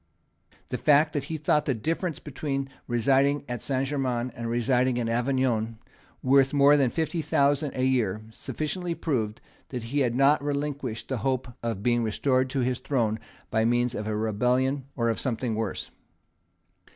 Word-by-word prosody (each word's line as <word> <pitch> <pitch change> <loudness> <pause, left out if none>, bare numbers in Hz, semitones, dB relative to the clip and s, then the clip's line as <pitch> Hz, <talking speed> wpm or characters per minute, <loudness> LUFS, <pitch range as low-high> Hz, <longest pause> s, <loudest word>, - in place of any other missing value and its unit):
The 125 - -3
fact 150 +1 +4
that 145 -2 -2
he 160 +1 -4
thought 150 0 +2
the 135 - +1
difference 165 - -2
between 135 -1 -4 0.2
residing 135 +4 +2
at 120 -2 -4
Saint 135 -1 0
Germains 130 -3 -1
and 115 0 -4
residing 125 +1 +2
at 115 - -1
Avignon 120 -2 0 0.5
worth 135 +1 +4
more 140 +1 +6
than 135 -4 +3
fifty 160 +4 -1
thousand 145 -1 +1
a 130 - 0
year 110 -6 +1
sufficiently 155 +9 -3
proved 115 -11 -2 0.3
that 125 -3 -5
he 130 +6 -1
had 120 -4 +1
not 140 +2 +4
relinquished 140 -5 -3
the 130 - -2
hope 130 0 -1
of 115 -4 -3
being 120 0 +2
restored 130 +4 +1
to 135 0 -1
his 125 0 0
throne 115 -6 0 0.3
by 110 0 +2
means 120 +1 +2
of 105 0 -4
a 110 - -1
rebellion 125 +5 +1
or 115 -2 0
of 115 - -1
something 120 -2 -1
worse. 110 -3 -3
130 Hz, 165 wpm, -27 LUFS, 115-140 Hz, 0.5 s, more